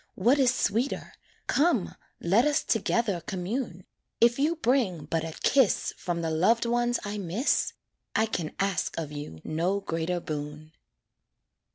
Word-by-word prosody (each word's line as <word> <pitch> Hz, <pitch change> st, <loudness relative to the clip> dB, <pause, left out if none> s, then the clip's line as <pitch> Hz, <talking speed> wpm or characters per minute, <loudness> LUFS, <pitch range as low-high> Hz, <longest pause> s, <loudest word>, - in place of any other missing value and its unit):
what 245 Hz, +9 st, +3 dB
is 255 Hz, -3 st, +5 dB
sweeter, 240 Hz, +2 st, -1 dB, 0.3 s
Come, 290 Hz, -, +2 dB, 0.3 s
let 195 Hz, +8 st, +3 dB
us 295 Hz, -1 st, +2 dB
together 220 Hz, -4 st, 0 dB
commune, 190 Hz, 0 st, -3 dB, 0.3 s
If 235 Hz, +2 st, +4 dB
you 310 Hz, +4 st, +2 dB
bring 235 Hz, -, +1 dB
but 160 Hz, +1 st, -1 dB
a 160 Hz, -1 st, -6 dB
kiss 265 Hz, -7 st, +3 dB
From 170 Hz, -1 st, -3 dB
the 160 Hz, -, -1 dB
loved 205 Hz, +10 st, +3 dB
ones 240 Hz, +1 st, +1 dB
I 205 Hz, +1 st, -3 dB
miss, 200 Hz, -, 0 dB, 0.4 s
I 220 Hz, -, +4 dB
can 175 Hz, -8 st, -4 dB
ask 195 Hz, -1 st, 0 dB
of 155 Hz, -3 st, -3 dB
you 145 Hz, -, -7 dB
no 175 Hz, +6 st, 0 dB
greater 165 Hz, -1 st, -2 dB
boon. 150 Hz, -1 st, -6 dB
195 Hz, 145 wpm, -28 LUFS, 165-240 Hz, 0.4 s, is